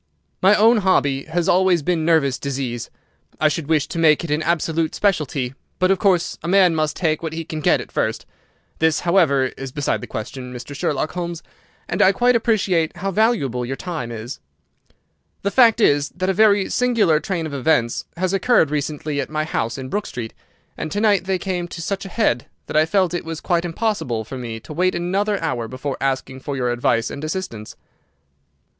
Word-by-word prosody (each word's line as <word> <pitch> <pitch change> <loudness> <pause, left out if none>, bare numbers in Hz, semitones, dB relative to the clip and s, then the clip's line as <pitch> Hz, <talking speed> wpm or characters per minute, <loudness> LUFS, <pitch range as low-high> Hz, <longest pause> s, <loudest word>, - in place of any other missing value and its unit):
"My 195 +3 +6
own 225 +3 +5
hobby 145 -9 +1
has 170 +2 -1
always 180 -3 +3
been 170 0 0
nervous 145 -6 +2
disease. 130 -4 -4 0.5
I 155 - +4
should 150 0 -3
wish 155 -2 +2
to 170 - -4
make 155 0 +4
it 165 - -4
an 150 +1 +1
absolute 165 -1 0
specialty, 145 -10 0 0.2
but, 185 +1 +2
of 195 - +2
course, 185 -4 +1
a 155 - -6
man 185 -1 +5
must 155 -2 0
take 155 -4 0
what 160 -1 -4
he 165 0 -4
can 155 0 -5
get 150 - +3
at - - -9
first. - - -1 0.5
This, 160 0 +2
however, 155 -8 +3
is 135 -1 -6
beside 145 +1 -1
the - - -7
question, 125 +3 -6
Mr. 125 +3 -8
Sherlock 145 +2 -1
Holmes, 175 -2 -5 0.4
and - - -1
I 190 - +6
quite 245 +4 +3
appreciate 195 -8 +1
how 195 +1 -2
valuable 190 - +1
your 130 +3 -3
time 155 -8 -5
is. 115 +2 -7 1.0
The 200 - 0
fact 235 -2 +5
is 145 -8 +3
that 185 +1 -1
a - - +2
very 205 -1 +4
singular 225 -11 +2
train 170 -1 -3
of 155 - -6
events 130 -4 +1
has 185 +1 0
occurred 195 - +3
recently 150 0 -2
at - - -6
my 155 0 -1
house 115 -7 -2
in 130 -1 -6
Brook 205 +5 -2
Street, 115 -2 -6 0.4
and 155 - -5
to 205 - -1
night 205 -4 +3
they 190 0 0
came 180 -1 -3
to 170 - -8
such 195 +4 -3
a - - -7
head 170 - 0 0.2
that - - -7
I 155 +1 +4
felt 185 0 +2
it 175 - -2
was 165 -1 -5
quite 175 -1 0
impossible 165 - -1
for 130 +4 -7
me 115 -2 -5
to 150 - -9
wait 185 +4 +1
another 195 +4 0
hour 120 -3 -2
before 130 +3 -5
asking 135 -1 -2
for 140 +1 -5
your 125 -2 0
advice 120 -1 0
and 140 - -7
assistance." 155 - -5
160 Hz, 200 wpm, -21 LUFS, 140-190 Hz, 1.0 s, My